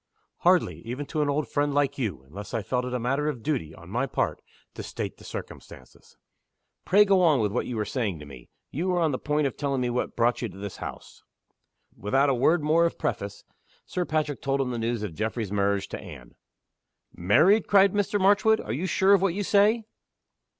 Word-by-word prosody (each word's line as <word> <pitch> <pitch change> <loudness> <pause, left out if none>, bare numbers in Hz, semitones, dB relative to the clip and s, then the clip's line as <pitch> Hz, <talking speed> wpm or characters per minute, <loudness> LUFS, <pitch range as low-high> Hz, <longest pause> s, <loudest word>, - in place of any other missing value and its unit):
"Hardly - - +2
even 125 +5 -5
to 155 +2 -2
an 145 - +1
old 145 +1 0
friend 145 -1 0
like 140 -1 +1
you 95 - -3
unless 100 - -8
I 110 - -1
felt 125 +4 -1
it 125 - -5
a - - -1
matter 135 +5 0
of 125 -7 -6
duty, 125 - -2
on 85 +2 -13
my 125 +5 0
part, - - -2 0.3
to - - -7
state - - -5
the - - -16
circumstances. 65 - -10 0.7
Pray 205 +3 +5
go 195 -2 +4
on 155 -6 +4
with 105 -3 0
what 120 - -2
you 125 - -4
were 105 - -1
saying 105 -5 -2
to 75 - -10
me. 65 -4 -13 0.2
You 170 +7 -2
were 180 -1 +1
on 160 -3 +2
the 130 - -3
point 150 0 0
of 135 - -2
telling 140 -2 -1
me 125 -1 0
what 125 - -2
brought 120 +1 +1
you 120 - -2
to 95 - -13
this 100 -1 -7
house." - - -9 0.7
Without 135 +8 +1
a - - +2
word 155 +6 +2
more 165 +3 +4
of - - -7
preface, 100 -3 -3 0.4
Sir 180 - -2
Patrick 155 -6 -2
told 140 0 0
him 130 -2 -1
the 120 - -3
news 115 -1 -2
of 100 -6 -4
Geoffrey's 110 +2 -3
marriage 100 -1 0
to - - -5
Anne. - - -11 0.8
"Married!" 155 - +4
cried 195 -1 +5
Mr. 205 0 0
Marchwood. 205 +3 +4
"Are 110 - -4
you 165 +10 -2
sure 190 +3 +4
of 195 - +4
what 190 -3 +1
you 205 - -1
say?" 210 +4 +3
135 Hz, 220 wpm, -26 LUFS, 110-165 Hz, 0.8 s, Pray